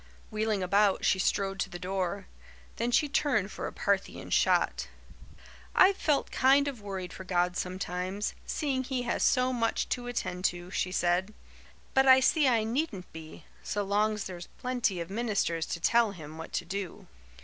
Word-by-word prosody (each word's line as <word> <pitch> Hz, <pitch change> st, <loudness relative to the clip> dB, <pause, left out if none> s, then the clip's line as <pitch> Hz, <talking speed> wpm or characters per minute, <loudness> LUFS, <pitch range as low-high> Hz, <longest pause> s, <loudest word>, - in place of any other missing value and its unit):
Wheeling 215 Hz, -2 st, 0 dB
about, 200 Hz, +2 st, +3 dB
she 190 Hz, -, +3 dB
strode 195 Hz, 0 st, 0 dB
to 195 Hz, -, -1 dB
the 175 Hz, -, -7 dB
door. 185 Hz, +1 st, -3 dB, 0.5 s
Then 235 Hz, +1 st, 0 dB
she 270 Hz, +5 st, +3 dB
turned 265 Hz, -8 st, +1 dB
for -, -, -5 dB
a -, -, -6 dB
Parthian 200 Hz, -1 st, -2 dB
shot. -, -, +2 dB, 0.9 s
"I've 385 Hz, +1 st, +6 dB
felt 300 Hz, -6 st, 0 dB
kind 275 Hz, +2 st, +4 dB
of 265 Hz, -6 st, -5 dB
worried 190 Hz, -3 st, -5 dB
for 190 Hz, -, -8 dB
God 180 Hz, -1 st, 0 dB
sometimes, 185 Hz, +2 st, -3 dB
seeing 270 Hz, -4 st, -1 dB
He 255 Hz, -1 st, -2 dB
has 240 Hz, -, -1 dB
so 255 Hz, -1 st, +3 dB
much 230 Hz, -2 st, 0 dB
to 245 Hz, -1 st, -2 dB
attend 185 Hz, -7 st, -3 dB
to," 175 Hz, 0 st, -1 dB
she 180 Hz, -, -1 dB
said, 180 Hz, +3 st, 0 dB, 0.6 s
"but 265 Hz, 0 st, +4 dB
I 260 Hz, 0 st, +9 dB
see 285 Hz, +2 st, +3 dB
I 230 Hz, -4 st, +3 dB
needn't 225 Hz, -, -3 dB
be, 160 Hz, -1 st, -10 dB, 0.2 s
so 205 Hz, 0 st, -2 dB
long's 210 Hz, +1 st, +1 dB
there's 175 Hz, -2 st, -7 dB
plenty 245 Hz, -7 st, -1 dB
of 170 Hz, +2 st, -5 dB
ministers 200 Hz, -7 st, -1 dB
to -, -, -3 dB
tell 230 Hz, +4 st, +3 dB
Him 155 Hz, -3 st, -10 dB
what 160 Hz, -, -8 dB
to -, -, -1 dB
do." 190 Hz, 0 st, -5 dB
200 Hz, 170 wpm, -29 LUFS, 180-245 Hz, 0.9 s, I